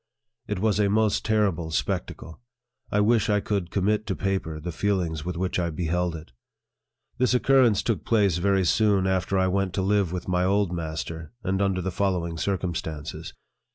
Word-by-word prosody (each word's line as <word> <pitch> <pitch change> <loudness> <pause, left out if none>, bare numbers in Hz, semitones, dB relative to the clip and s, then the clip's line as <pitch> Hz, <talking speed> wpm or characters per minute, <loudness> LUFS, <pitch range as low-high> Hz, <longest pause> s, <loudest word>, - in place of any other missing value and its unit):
It 105 - -2
was 105 +1 +1
a 100 -1 +3
most 110 0 +2
terrible 100 -7 +1
spectacle. 80 +1 -3 0.5
I 105 - +2
wish 110 +1 +3
I 105 0 +3
could 100 -4 -2
commit 105 +3 0
to 95 - -1
paper 95 -5 -2
the 85 +3 -5
feelings 85 -4 -1
with 90 0 -4
which 90 0 -1
I 85 -1 0
beheld 85 +1 -1
it. 80 -4 -10 0.9
This 125 0 +3
occurrence 125 -4 +4
took 115 -4 -1
place 100 -7 +2
very 95 +1 +2
soon 100 +1 +3
after 95 +1 0
I 95 - +3
went 95 -1 0
to 95 - 0
live 100 -3 +1
with 90 -1 -5
my 90 0 +1
old 100 0 +2
master, 80 0 -5
and 95 +1 0
under 95 -2 0
the 95 - -2
following 85 -4 -1
circumstances. 85 -6 -4
95 Hz, 175 wpm, -25 LUFS, 85-105 Hz, 0.9 s, occurrence